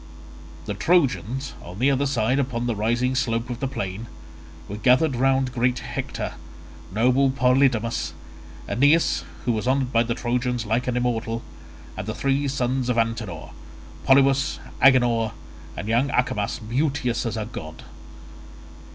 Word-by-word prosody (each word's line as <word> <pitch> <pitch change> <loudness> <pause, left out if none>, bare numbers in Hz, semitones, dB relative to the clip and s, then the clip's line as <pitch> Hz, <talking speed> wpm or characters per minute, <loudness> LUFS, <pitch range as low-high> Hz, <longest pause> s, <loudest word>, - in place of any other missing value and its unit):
The 105 - -3
Trojans, 135 - +1
on 90 +2 -10
the 130 +5 +3
other 140 +1 +1
side 125 0 +1
upon 125 -3 -1
the 120 -2 -1
rising 120 +4 0
slope 120 -1 -1
of 120 - -5
the 135 - -1
plain, 100 -3 -5 0.6
were 105 - -6
gathered 130 +6 +3
round 130 0 +2
great 125 0 +1
Hector, - - -4 0.6
noble 125 +6 +3
Polydamas, 125 -3 +1 0.5
Aeneas 145 +6 +3 0.2
who 120 - +2
was 110 +1 -2
honoured 130 -1 +1
by 115 - +4
the 115 0 -1
Trojans 125 -1 -1
like 115 +4 0
an 125 -1 0
immortal, 115 -2 -1 0.5
and 95 +2 -6
the 110 - -3
three 140 +1 0
sons 130 -1 -1
of 120 - +1
Antenor, 115 -7 -2 0.5
Polybus, 135 0 +4 0.2
Agenor, 120 -5 +4 0.4
and 100 - -5
young 120 +5 +2
Acamas 115 -6 0
beauteous 125 +1 -1
as 115 -1 -3
a 110 - -2
god. 80 -8 -8
125 Hz, 140 wpm, -24 LUFS, 115-135 Hz, 0.6 s, by